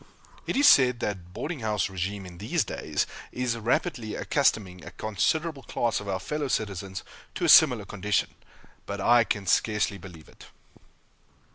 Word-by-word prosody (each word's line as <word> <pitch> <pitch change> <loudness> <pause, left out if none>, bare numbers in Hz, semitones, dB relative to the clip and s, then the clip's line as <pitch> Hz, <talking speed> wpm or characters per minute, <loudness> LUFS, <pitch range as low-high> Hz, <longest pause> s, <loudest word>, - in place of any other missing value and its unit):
It - - -1
is 285 +1 +5
said 125 -3 +6
that 90 -4 -4
boarding 155 - -5
house 105 -4 0
régime 95 +1 -4
in 85 -1 -11
these 140 - 0
days - - -2 0.3
is 125 -2 -1
rapidly 115 -1 -1
accustoming 100 - 0
a - - -8
considerable 145 - -1
class 120 -1 -1
of 105 - -9
our 95 -1 -1
fellow 150 +8 -3
citizens 100 -5 -3 0.3
to - - -1
a - - +2
similar - - +7
condition, 105 +1 -1 0.5
but 100 0 -4
I 120 +4 +5
can 100 -3 -3
scarcely 105 +1 +1
believe 85 -3 -12
it. - - -16
105 Hz, 155 wpm, -27 LUFS, 95-125 Hz, 0.5 s, similar